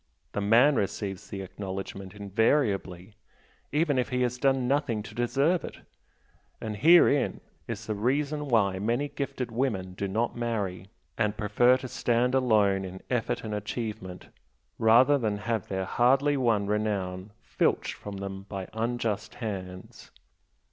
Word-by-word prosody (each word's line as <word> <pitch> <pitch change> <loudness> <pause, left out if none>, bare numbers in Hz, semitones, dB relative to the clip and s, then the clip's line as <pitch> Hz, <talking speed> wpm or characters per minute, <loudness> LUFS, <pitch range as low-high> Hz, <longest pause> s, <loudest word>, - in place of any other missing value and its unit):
The 105 - -2
man 120 +7 +5
receives 100 -1 -3
the 95 -1 -5
acknowledgment 95 0 -7
invariably, 100 -3 0 0.6
even 150 -2 +2
if 125 - -1
he 125 -1 0
has 125 0 -1
done 135 -2 +2
nothing 135 -6 0
to 105 - -10
deserve 135 +9 +1
it, - - -7 0.8
and 110 -1 -4
herein 155 -1 +5 0.3
is - - -5
the 110 - -2
reason 145 +7 -1
why 100 -6 +2
many 120 +8 0
gifted 135 -4 -4
women 110 -7 -1
do 100 +2 -3
not 110 +5 -1
marry, 105 -6 -3 0.3
and 105 -1 +1
prefer 120 +4 +4
to 130 - -7
stand 120 +1 +1
alone 105 -7 +3
in 95 0 -7
effort 120 -3 -1
and 110 -2 -4
achievement 105 -3 -5 0.5
rather 125 +6 +5
than 110 -4 -1
have 110 0 -2
their 95 -1 -2
hardly 135 +7 +3
won 115 -6 +2
renown 100 -2 -2
filched - - 0
from 100 -1 -8
them 95 0 -6
by 95 -2 -5
unjust 115 -2 -2
hands. 95 -5 -7
110 Hz, 140 wpm, -28 LUFS, 100-125 Hz, 0.8 s, man